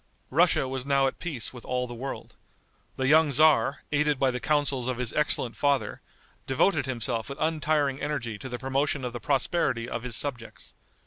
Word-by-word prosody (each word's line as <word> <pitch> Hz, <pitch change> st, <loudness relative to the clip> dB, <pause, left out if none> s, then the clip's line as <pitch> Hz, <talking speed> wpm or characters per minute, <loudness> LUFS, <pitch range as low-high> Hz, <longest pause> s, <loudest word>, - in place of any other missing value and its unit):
Russia 160 Hz, -2 st, +3 dB
was 130 Hz, -1 st, -3 dB
now 140 Hz, 0 st, +2 dB
at 135 Hz, -, -2 dB
peace 150 Hz, -10 st, -2 dB
with 125 Hz, -, -11 dB
all 125 Hz, 0 st, -2 dB
the 120 Hz, -, -8 dB
world. 130 Hz, +3 st, -7 dB, 0.6 s
The 130 Hz, -, 0 dB
young 155 Hz, +2 st, +5 dB
tzar, 145 Hz, 0 st, +4 dB
aided 150 Hz, -1 st, +2 dB
by 130 Hz, 0 st, +2 dB
the 125 Hz, -, -4 dB
counsels 140 Hz, -3 st, 0 dB
of 130 Hz, -2 st, -1 dB
his 125 Hz, -2 st, -1 dB
excellent 130 Hz, -6 st, +1 dB
father, 135 Hz, -4 st, 0 dB, 0.5 s
devoted 140 Hz, +5 st, +2 dB
himself 120 Hz, -2 st, -2 dB
with 140 Hz, -, -6 dB
untiring 155 Hz, -3 st, 0 dB
energy 130 Hz, -7 st, -3 dB
to 130 Hz, -, -7 dB
the 125 Hz, -, -4 dB
promotion 135 Hz, +1 st, -1 dB
of 125 Hz, -, -4 dB
the 120 Hz, -, -5 dB
prosperity 130 Hz, -3 st, 0 dB
of 115 Hz, -, -4 dB
his 125 Hz, -1 st, -3 dB
subjects. 120 Hz, -4 st, -5 dB
135 Hz, 185 wpm, -27 LUFS, 125-145 Hz, 0.6 s, young